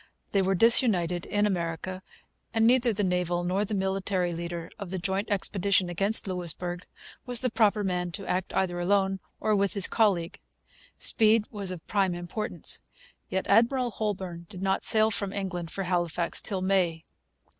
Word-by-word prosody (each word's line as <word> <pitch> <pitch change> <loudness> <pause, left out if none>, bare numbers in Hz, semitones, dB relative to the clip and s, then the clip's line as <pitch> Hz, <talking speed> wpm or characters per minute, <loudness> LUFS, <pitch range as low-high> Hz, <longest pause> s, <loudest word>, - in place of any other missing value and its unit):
They 200 - +2
were 190 +1 +1
disunited 180 - +4
in 205 0 +1
America. 185 -1 -3 0.5
And 225 0 +3
neither 245 0 +4
the 205 -1 -1
naval 180 -1 0
nor 185 +3 0
the 210 - -3
military 190 -2 -1
leader 170 0 -6
of 200 -3 -6
the 190 - -1
joint 190 +3 -2
expedition 195 -2 +1
against 200 +5 +1
Louisbourg 180 -1 -4 0.4
was 245 -2 +6
the 255 -2 -1
proper 215 -2 +2
man 180 -2 -2
to 195 0 -4
act 185 0 -2
either 175 -2 0
alone 195 +1 +1 0.2
or 215 - +1
with 200 -2 +1
his 195 -2 +6
colleague. 190 -6 +1 0.6
Speed 220 0 +3
was 200 -3 -5
of 180 -3 -7
prime 195 -4 0
importance. 175 +5 -3 0.5
Yet 190 0 -2
Admiral 240 +4 +3
Holbourne 185 -6 -4
did 190 -2 -8
not 190 0 0
sail 220 0 +5
from 200 -2 -2
England 180 -4 -4
for 195 - -4
Halifax 175 -2 -1
till 190 -3 -2
May. 180 -4 +1
190 Hz, 165 wpm, -27 LUFS, 175-205 Hz, 0.6 s, was